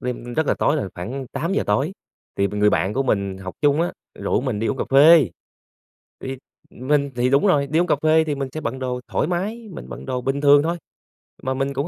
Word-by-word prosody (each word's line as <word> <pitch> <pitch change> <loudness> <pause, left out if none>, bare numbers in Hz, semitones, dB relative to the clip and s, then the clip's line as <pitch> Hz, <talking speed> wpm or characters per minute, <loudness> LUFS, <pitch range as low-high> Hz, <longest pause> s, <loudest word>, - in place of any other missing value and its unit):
đêm 120 -1 -5
rất 160 +1 +1
là - - +2
tối 150 - +1
rồi, 135 - -2
khoảng 130 +10 -5
8:00 180 +6 -1
tối, 135 - +1 0.4
thì 100 - +2
b 105 - -6
người 105 0 +3
bạn 95 +4 0
của 135 - +1
mình 100 -6 -1
học 95 -1 -7
chung 145 +1 +3
á 175 - 0 0.3
rủ - - 0
mình 125 -5 -2
đi 115 - -1
uống 135 - -1
cà - - -2
phê. 145 - +7 0.9
Thì 130 0 -5 0.3
mình 140 +2 0
thì 125 +1 +1
đúng 140 +9 +3
rồi, 145 -7 +3
đi 155 +4 +1
uống 175 - +2
cà 150 - +2
phê 160 0 +4
thì 150 -2 -2
mình 135 -1 -3
sẽ 155 - -5
bận 130 -2 -4
đồ 125 -1 -3
thoải - - 0
mái, 210 +6 -3
mình - - -9
bận - - -9
đồ 130 -1 -2
bình 135 +3 -2
thường 145 0 +6
thôi, 170 +3 -1 0.7
mà 130 - -1
mình 135 +1 -2
cũng 140 +4 -2
135 Hz, 245 wpm, -22 LUFS, 125-155 Hz, 0.9 s, phê